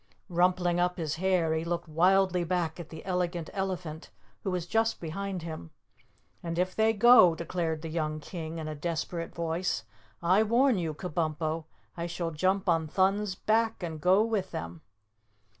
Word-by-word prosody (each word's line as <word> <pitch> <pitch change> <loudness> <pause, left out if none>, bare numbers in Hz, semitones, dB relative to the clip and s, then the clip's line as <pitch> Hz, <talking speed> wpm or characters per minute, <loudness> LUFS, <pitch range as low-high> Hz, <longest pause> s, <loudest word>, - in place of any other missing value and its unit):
Rumpling 175 0 +2
up 180 +1 +1
his 160 -2 -2
hair, 180 -3 +2
he 160 0 -1
looked 170 0 -3
wildly 180 +3 +3
back 170 -1 -1
at 170 -1 -8
the 160 - -10
Elegant 180 -3 -2
Elephant, 180 -5 -4 0.3
who 195 - -1
was 180 -2 -2
just 225 +4 +1
behind 185 +2 -4
him. 155 - -7 0.7
"And 165 0 -4
if 185 +1 0
they 220 0 +4
go," 225 -6 +7
declared 165 -2 -3
the - - -4
young 155 -1 -2
King 160 0 -6
in 160 -1 -5
a 155 - -3
desperate 165 +2 -4
voice, 170 -6 -1 0.4
"I 185 +5 +4
warn 235 +1 +3
you, 160 -3 -2
Kabumpo, 160 -2 -2 0.3
I 170 0 -3
shall 170 -1 -3
jump 185 +5 0
on 165 -2 +2
Thun's 195 +3 +1
back 225 0 +1
and 160 -3 -5
go 185 +6 +5
with 215 -4 -1
them." 85 0 -6
175 Hz, 165 wpm, -29 LUFS, 160-190 Hz, 0.7 s, go